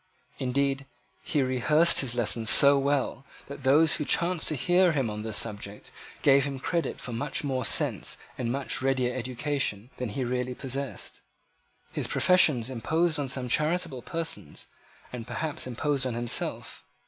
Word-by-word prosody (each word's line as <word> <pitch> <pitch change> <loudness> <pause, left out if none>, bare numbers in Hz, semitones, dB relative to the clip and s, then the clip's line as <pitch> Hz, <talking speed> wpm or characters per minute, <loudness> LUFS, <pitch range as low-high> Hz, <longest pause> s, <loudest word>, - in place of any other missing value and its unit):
Indeed 135 +1 -1 0.3
he 145 -3 0
rehearsed 150 +6 +4
his 125 -3 +2
lesson 115 -1 +1
so 140 +4 +6
well, 140 -1 0 0.2
that 140 0 -9
those 145 +5 +4
who - - -2
chanced 170 +3 +1
to 155 - +1
hear 175 +6 +3
him 135 -7 -1
on 105 0 -5
this 110 -1 0
subject 105 -2 -1 0.3
gave 140 -1 +5
him 140 -1 -3
credit 165 +5 -2
for 120 +1 -7
much 135 +6 -3
more 130 -3 -2
sense - - +1 0.2
and 120 -2 -3
much 135 0 -1
readier 130 -2 0
elocution 130 -2 -3
than 125 -2 -4
he 130 +6 -3
really 125 0 -2
possessed. 135 +1 -5 0.7
His - - -3
professions 150 -10 +4
imposed 160 +6 0
on 140 -2 -3
some 130 -1 -2
charitable 155 +1 0
persons, 165 - -5 0.5
and 120 -1 -7
perhaps 155 -4 -4
imposed 135 +1 -1
on 120 - -3
himself. 120 0 -3
135 Hz, 155 wpm, -27 LUFS, 125-145 Hz, 0.7 s, so